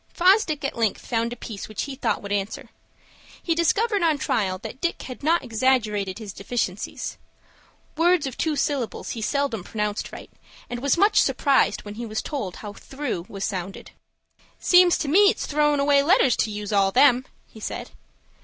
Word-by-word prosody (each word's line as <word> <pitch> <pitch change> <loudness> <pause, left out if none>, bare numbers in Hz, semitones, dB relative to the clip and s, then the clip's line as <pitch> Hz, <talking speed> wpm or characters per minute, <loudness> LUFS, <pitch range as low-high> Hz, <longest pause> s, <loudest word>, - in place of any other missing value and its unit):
Fosdick 360 -5 +3
at 275 - -2
length 225 -3 -1
found 230 -1 -1
a - - -4
piece 220 -4 -8
which 215 - -3
he 280 - -5
thought - - -1
would 200 - -6
answer. 205 0 -3 0.7
He 335 - +1
discovered 405 +6 +1
on 320 -3 +3
trial 195 -8 0
that 260 - -8
Dick 345 - -2
had 255 - -8
not 325 +3 +2
exaggerated 220 -5 0
his 215 -4 -8
deficiencies. 200 -2 -4 0.8
Words 340 0 +3
of 265 - -4
two 315 -2 -1
syllables 275 -5 -2
he 230 - -5
seldom 255 -4 -1
pronounced 210 +1 -3
right, - - -10 0.4
and 245 - -3
was 280 +4 +2
much 415 +3 +5
surprised 275 -2 +2
when 205 - -8
he 235 - -5
was 215 0 -3
told 250 - -4
how 210 -1 -8
"through" 260 -9 -5
was 195 -1 -4
sounded. 190 -1 -5 0.7
"Seems 360 -1 +5
to 305 - -3
me 400 +8 +6
it's - - -2
throwin' 295 -1 +2
away 280 0 +4
letters 280 -5 +4
to - - +1
use 210 0 -5
all 195 -1 +3
them," 255 +1 +4 0.2
he 220 - -15
said. - - -6
255 Hz, 180 wpm, -24 LUFS, 210-300 Hz, 0.8 s, me